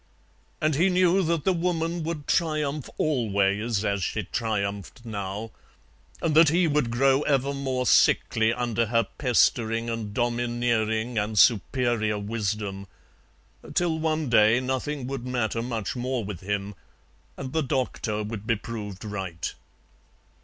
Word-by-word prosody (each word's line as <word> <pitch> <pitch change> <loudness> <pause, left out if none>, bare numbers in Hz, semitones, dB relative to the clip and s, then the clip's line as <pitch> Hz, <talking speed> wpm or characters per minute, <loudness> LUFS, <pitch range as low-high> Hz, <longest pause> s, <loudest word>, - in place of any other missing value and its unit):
And 155 0 +1
he 170 +7 +3
knew 185 +1 +3
that 165 -3 0
the 190 - +3
Woman 170 -1 -1
would 160 -2 -4
triumph 155 -4 0
always 105 -5 +1
as 100 -1 0
she - - -2
triumphed 105 +1 -3
now, 105 0 -5 0.7
and 165 -2 +1
that 160 0 +7
he 175 +3 +3
would 150 -5 +1
grow 135 +3 +3
ever 140 -1 +1
more 130 -2 -2
sickly 110 -2 +4
under 115 -1 0
her 115 +1 +2 0.2
pestering 115 -3 +2
and 110 -2 -4
domineering 120 -1 0
and 105 +1 -2
superior 110 +1 +3
wisdom, 100 -2 -3 0.9
till 170 -2 +1
one 155 -1 0
day 115 0 +5
nothing 130 +2 -2
would 135 -1 -4
matter 120 -3 -1
much 115 -3 -3
more 125 -1 -2
with 100 -4 -6
him, 100 +2 -3 0.6
and 130 -1 -6
the 160 - +2
doctor 125 -6 -2
would 105 0 -6
be 115 - +3
proved 105 -2 -7
right. 95 -5 -4
120 Hz, 135 wpm, -26 LUFS, 105-140 Hz, 0.9 s, that